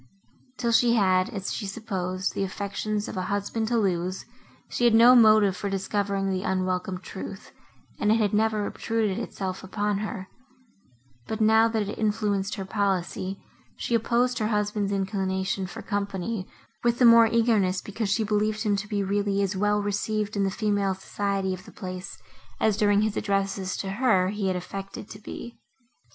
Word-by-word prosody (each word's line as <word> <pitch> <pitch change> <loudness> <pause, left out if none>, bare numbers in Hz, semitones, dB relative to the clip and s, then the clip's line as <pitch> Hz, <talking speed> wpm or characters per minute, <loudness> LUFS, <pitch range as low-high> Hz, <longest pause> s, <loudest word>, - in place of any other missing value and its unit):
Till 235 -2 0
she 235 +1 +4
had, 185 -3 +3
as 195 -2 -4
she 205 - -4
supposed, 190 -3 -3
the - - -1
affections 200 +2 -3
of - - -6
a - - 0
husband 205 +2 -1
to 235 +1 +1
lose, 185 -3 -1 0.4
she 240 - 0
had 235 -2 +5
no 235 +2 +8
motive 215 -5 +6
for 200 +1 -3
discovering 195 0 -1
the 185 -1 -1
unwelcome 185 -1 -1
truth, 190 +1 -8 0.5
and 210 - +2
it - - +5
had 215 -3 +1
never 215 -1 +2
obtruded 220 -4 -1
itself 190 -1 -4
upon 205 +1 -1
her; 205 -2 -5 1.0
but, 220 - -3
now 220 +1 +5
that 220 -3 -1
it 205 - -6
influenced 210 -2 0
her 195 -2 -5
policy, 190 -1 -1 0.4
she - - -3
opposed 240 +2 +2
her 215 - +1
husband's 210 -1 0
inclination 190 -1 -1
for - - -8
company, 200 0 -3 0.4
with 235 0 +2
the 250 - +5
more 230 -1 +8
eagerness, 220 -5 +2
because 205 0 -4
she 220 +3 +2
believed 215 +1 0
him 210 -2 +2
to 200 +1 -4
be 205 -1 -1
really 200 0 0
as 195 0 -1
well 210 +1 +1
received 205 +1 -1
in 200 - +1
the 195 - +2
female 200 -2 0
society 195 0 -2
of 185 0 -8
the - - -12
place, 185 +1 -7 0.4
as, 215 -2 +3
during 205 0 +3
his 215 -1 -1
addresses 195 -1 -1
to 195 - -3
her, 195 -4 +2
he 205 -1 -2
had 185 - 0
affected 195 +3 -6
to 210 - -10
be. 235 +2 -9
205 Hz, 175 wpm, -26 LUFS, 190-215 Hz, 1.0 s, no